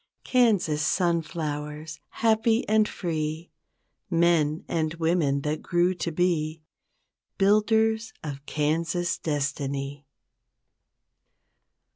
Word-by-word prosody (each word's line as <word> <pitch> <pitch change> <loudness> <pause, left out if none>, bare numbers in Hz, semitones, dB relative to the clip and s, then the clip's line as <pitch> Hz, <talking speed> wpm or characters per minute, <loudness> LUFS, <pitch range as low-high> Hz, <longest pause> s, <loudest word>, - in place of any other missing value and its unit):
Kansas 210 - +2
sunflowers 155 -2 -2
happy 225 +1 +2
and 215 0 +3
free 160 -1 -3 0.6
Men 165 -3 +2
and 160 -1 -1
women 160 -4 +1
that 150 +2 -2
grew 175 +1 +2
to 175 -2 -3
be 160 -2 0 0.7
Builders 220 +2 +3
of 140 -3 -6
Kansas 165 +4 0
destiny. 140 -1 -3
165 Hz, 80 wpm, -26 LUFS, 150-185 Hz, 0.7 s, and